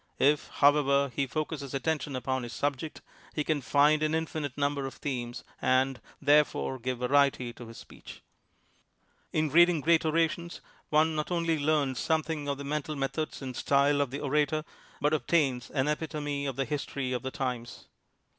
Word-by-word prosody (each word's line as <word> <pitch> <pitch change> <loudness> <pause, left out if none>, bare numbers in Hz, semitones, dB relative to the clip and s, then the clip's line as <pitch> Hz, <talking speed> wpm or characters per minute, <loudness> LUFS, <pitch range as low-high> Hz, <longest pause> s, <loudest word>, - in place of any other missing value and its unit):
If, 145 +2 +3
however, 140 -1 +3
he 140 - 0
focuses 145 -1 -4
attention 145 -1 -1
upon 130 0 -1
his 120 0 -7
subject, 145 +2 -3 0.3
he 150 - 0
can 150 -1 0
find 150 +3 +4
an 155 +1 +1
infinite 155 -4 -3
number 140 -1 0
of 135 - -9
themes 120 -4 -4 0.2
and, 130 0 +2 0.2
therefore, 145 -2 +2
give 125 +1 -2
variety 130 -1 +2
to 120 0 -11
his 115 - -11
speech. - - -12 1.1
In 155 -2 0
reading 175 0 +6
great 165 +2 +3
orations 165 +2 0 0.3
one 155 +1 +3
not 155 -1 -2
only 165 -2 0
learns 145 -3 +1
something 160 -2 -1
of 140 -1 -1
the 140 - -6
mental 150 +1 -3
methods 140 +2 -3
and 130 -2 -5
style 140 +2 +3
of 140 -3 -1
INTRODUCTION 140 - -4
the - - -7
orator, 150 +2 +1 0.3
but 150 +2 +1
obtains 140 -5 +1
an 135 -1 0
epitome 150 -2 -2
of 135 - -3
the 135 +1 -1
history 140 -3 -3
of 125 - -2
the 130 - -3
times. 125 -3 -4
145 Hz, 170 wpm, -29 LUFS, 135-155 Hz, 1.1 s, reading